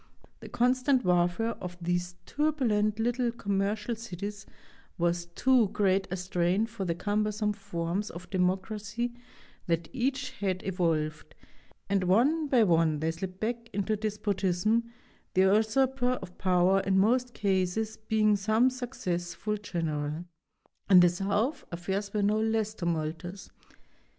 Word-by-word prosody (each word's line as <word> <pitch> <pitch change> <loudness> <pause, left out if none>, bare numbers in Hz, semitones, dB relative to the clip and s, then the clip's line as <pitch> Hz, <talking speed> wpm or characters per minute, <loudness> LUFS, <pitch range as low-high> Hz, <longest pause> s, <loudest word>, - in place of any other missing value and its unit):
The - - -10
constant 255 +1 +2
warfare 180 +6 +2
of 180 -1 -6
these 175 +1 -2
turbulent 235 -9 +1
little 240 +1 0
commercial 210 +1 -1
cities 205 -2 -7 0.5
was 175 0 0
too 245 +6 +3
great 195 -2 +1
a 185 - -3
strain 180 +3 +1
for 225 -3 -5
the 170 -2 -1
cumbersome 210 +2 0
forms 195 0 -3
of 175 +2 -9
democracy 210 +5 -1 0.5
that 165 -1 0
each 260 +1 -1
had 195 -7 -3
evolved, 160 -5 -1 0.5
and 195 -2 +1
one 275 - +3
by 250 -5 +4
one 165 -5 +3
they 160 +1 0
slipped 185 +2 -6
back 230 +1 -3
into 205 +2 0
despotism, 210 +1 0 0.4
the 185 - +5
usurper 245 +6 +3
of 180 -7 -7
power 185 +1 +3
in 195 0 +1
most 240 +5 +2
cases 200 +2 0
being 215 -1 +2
some 220 +6 +3
successful 210 -5 -3
general. 160 -5 -3 0.6
In 185 -2 +9
the 175 - +6
South 200 - -1
affairs 190 +4 -3
were 210 -1 0
no 210 +2 +2
less 220 -1 0
tumultuous. 170 +1 -4
200 Hz, 130 wpm, -29 LUFS, 180-225 Hz, 0.6 s, In